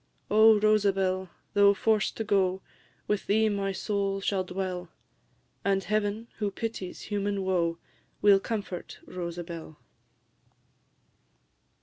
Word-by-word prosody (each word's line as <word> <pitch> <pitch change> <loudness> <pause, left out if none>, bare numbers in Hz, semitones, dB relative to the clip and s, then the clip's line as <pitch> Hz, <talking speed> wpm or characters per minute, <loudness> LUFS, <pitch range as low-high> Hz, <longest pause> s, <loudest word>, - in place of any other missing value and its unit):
"O 220 +1 +7
Rosabel! 195 -3 +2 0.2
though 200 -1 +6
forced 215 +1 +1
to 225 - -1
go, 190 -2 +1 0.4
With 210 -1 -1
thee 220 +2 +3
my 200 -1 -1
soul 195 +1 -1
shall 195 -1 0
dwell, 180 -1 -4 0.7
And 195 -1 +1
Heaven, 215 +3 -1
who 210 -2 0
pities 200 -3 -5
human 205 -1 -2
woe, 170 -3 +1 0.4
Will 200 -1 +6
comfort 200 -4 -5
Rosabel!" 170 -3 -6
195 Hz, 105 wpm, -28 LUFS, 185-210 Hz, 0.7 s, O